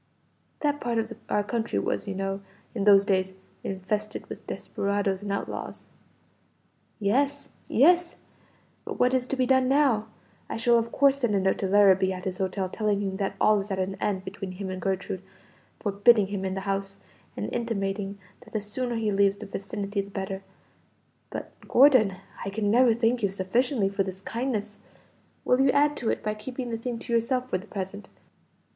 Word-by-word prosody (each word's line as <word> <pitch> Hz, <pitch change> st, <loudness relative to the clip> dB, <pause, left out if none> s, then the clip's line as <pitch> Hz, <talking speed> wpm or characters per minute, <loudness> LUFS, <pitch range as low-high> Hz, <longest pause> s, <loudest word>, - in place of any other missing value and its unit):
"That 290 Hz, -1 st, 0 dB
part 240 Hz, -1 st, -1 dB
of 225 Hz, 0 st, -1 dB, 0.2 s
our 205 Hz, -, +2 dB
country 220 Hz, -, -2 dB
was, 100 Hz, 0 st, -1 dB
you 195 Hz, -, -3 dB
know, 195 Hz, 0 st, -2 dB, 0.3 s
in 200 Hz, -4 st, -2 dB
those 200 Hz, -1 st, +7 dB
days, 190 Hz, -1 st, +1 dB, 0.3 s
infested 205 Hz, +3 st, -3 dB
with -, -, -9 dB
desperadoes 200 Hz, -1 st, -1 dB
and 205 Hz, -1 st, -4 dB
outlaws." 200 Hz, -, -4 dB, 1.1 s
"Yes, 275 Hz, +7 st, +1 dB, 0.2 s
yes; 345 Hz, +7 st, +4 dB, 0.7 s
but -, -, -6 dB
what 250 Hz, +1 st, +4 dB
is 255 Hz, -1 st, +1 dB
to 275 Hz, -, -1 dB
be 260 Hz, -1 st, +2 dB
done 260 Hz, 0 st, +3 dB
now? 265 Hz, -6 st, +3 dB, 0.4 s
I -, -, -3 dB
shall 235 Hz, +1 st, +4 dB
of 230 Hz, 0 st, -3 dB
course 280 Hz, 0 st, +4 dB
send 240 Hz, -6 st, +1 dB
a -, -, +3 dB
note 190 Hz, 0 st, +1 dB
to 195 Hz, -, 0 dB
Larrabee, 190 Hz, -1 st, +5 dB
at 185 Hz, 0 st, -7 dB
his 185 Hz, 0 st, -3 dB
hotel, 190 Hz, 0 st, -1 dB
telling 210 Hz, +1 st, 0 dB
him 190 Hz, -1 st, -2 dB
that 195 Hz, -1 st, -2 dB
all 215 Hz, -1 st, +5 dB
is 200 Hz, +1 st, -5 dB
at 195 Hz, -, -2 dB
an 190 Hz, +1 st, -1 dB
end 190 Hz, -2 st, -1 dB
between 190 Hz, -1 st, -6 dB
him 190 Hz, 0 st, -5 dB
and 185 Hz, 0 st, -5 dB
Gertrude, 190 Hz, -1 st, -2 dB, 0.6 s
forbidding 205 Hz, 0 st, +4 dB
him 190 Hz, -2 st, -2 dB
the 195 Hz, -, -3 dB
house, 195 Hz, 0 st, -2 dB, 0.4 s
and -, -, -3 dB
intimating 200 Hz, -4 st, -2 dB, 0.3 s
that -, -, -18 dB
the 215 Hz, -, +1 dB
sooner 235 Hz, +4 st, -3 dB
he 220 Hz, -2 st, 0 dB
leaves 200 Hz, 0 st, +3 dB
the -, -, -8 dB
vicinity 200 Hz, +1 st, -3 dB
the 195 Hz, -, -10 dB
better. 195 Hz, -1 st, -4 dB, 0.9 s
But -, -, -6 dB, 0.2 s
Gordon, 250 Hz, -8 st, +6 dB, 0.3 s
I 195 Hz, -, -3 dB
can 205 Hz, 0 st, 0 dB
never 240 Hz, 0 st, +5 dB
thank 235 Hz, +1 st, +1 dB
you 200 Hz, -, +2 dB
sufficiently 200 Hz, +4 st, +1 dB
for 200 Hz, 0 st, -1 dB
this 190 Hz, -1 st, -3 dB
kindness; 220 Hz, -2 st, -3 dB, 0.7 s
will 250 Hz, +1 st, +4 dB
you 270 Hz, -, +5 dB
add 290 Hz, +2 st, +3 dB
to 235 Hz, -, -1 dB
it -, -, -1 dB
by 215 Hz, -, 0 dB
keeping 245 Hz, +3 st, -6 dB
the 230 Hz, -, -1 dB
thing 240 Hz, 0 st, -3 dB
to 235 Hz, +1 st, -5 dB
yourself 250 Hz, +2 st, +1 dB
for 185 Hz, -, +1 dB
the 200 Hz, -, -13 dB
present? 200 Hz, 0 st, -6 dB
205 Hz, 185 wpm, -27 LUFS, 195-240 Hz, 1.1 s, those